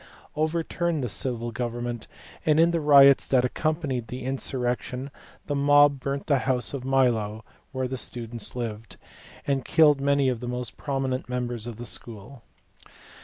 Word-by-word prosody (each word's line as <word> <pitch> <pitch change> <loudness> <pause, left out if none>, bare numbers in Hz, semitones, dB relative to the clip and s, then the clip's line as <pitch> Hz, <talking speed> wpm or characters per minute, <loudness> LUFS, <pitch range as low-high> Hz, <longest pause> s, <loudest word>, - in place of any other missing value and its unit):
overturned 160 0 -1
the - - -1
civil 120 +2 -2
government, 120 0 -4 0.4
and 155 0 +3
in 165 +1 +5
the 170 - 0
riots 140 -3 +6
that 125 -2 +3
accompanied 145 -4 -2
the 125 +3 -7
insurrection 130 0 -2 0.3
the 145 - -3
mob 145 0 +4
burnt 140 +1 -3
the 140 -3 +2
house 125 0 -1
of 135 -3 -4
Milo 115 -5 +1 0.3
(where 130 -2 -2
the 130 +1 -4
students 115 0 -4
lived) 115 -3 -6 0.5
and 135 -2 0
killed 150 -3 +4
many 140 -1 +2
of 125 -3 0
the 120 - -6
most 125 0 -4
prominent 135 -3 -3
members 120 -2 -3
of 120 - -6
the 120 +2 -8
school. 115 +2 -5
130 Hz, 155 wpm, -26 LUFS, 120-140 Hz, 0.5 s, riots